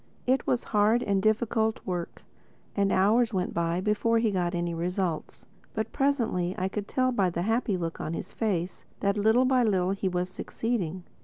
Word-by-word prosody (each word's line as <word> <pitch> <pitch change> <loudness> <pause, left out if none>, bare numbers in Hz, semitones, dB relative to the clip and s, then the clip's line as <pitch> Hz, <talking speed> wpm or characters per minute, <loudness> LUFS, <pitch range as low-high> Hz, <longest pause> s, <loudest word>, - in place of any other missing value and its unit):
It 260 +2 +1
was 245 - +1
hard 215 +4 +4
and 200 -1 +1
difficult 220 +1 +1
work; 180 -2 -4 0.5
and 200 -1 +2
hours 220 +4 +3
went 180 -1 -1
by 170 +1 0
before 210 +3 +2
he 225 -1 +2
got 180 -2 -1
any 175 0 -1
results. 175 -1 -3 0.3
But 220 0 -2
presently 230 -10 0
I 185 +1 -1
could 205 0 -4
tell 255 0 +1
by 195 -6 +2
the 170 0 -2
happy 225 -1 +1
look 165 -2 -4
on 165 - -3
his - - -6
face 190 -5 -2 0.2
that 200 0 +2
little 220 +5 +4
by 255 -1 +3
little 190 -5 +2
he 195 -1 -1
was 180 0 -1
succeeding. 185 -2 -3
200 Hz, 180 wpm, -28 LUFS, 180-225 Hz, 0.5 s, hard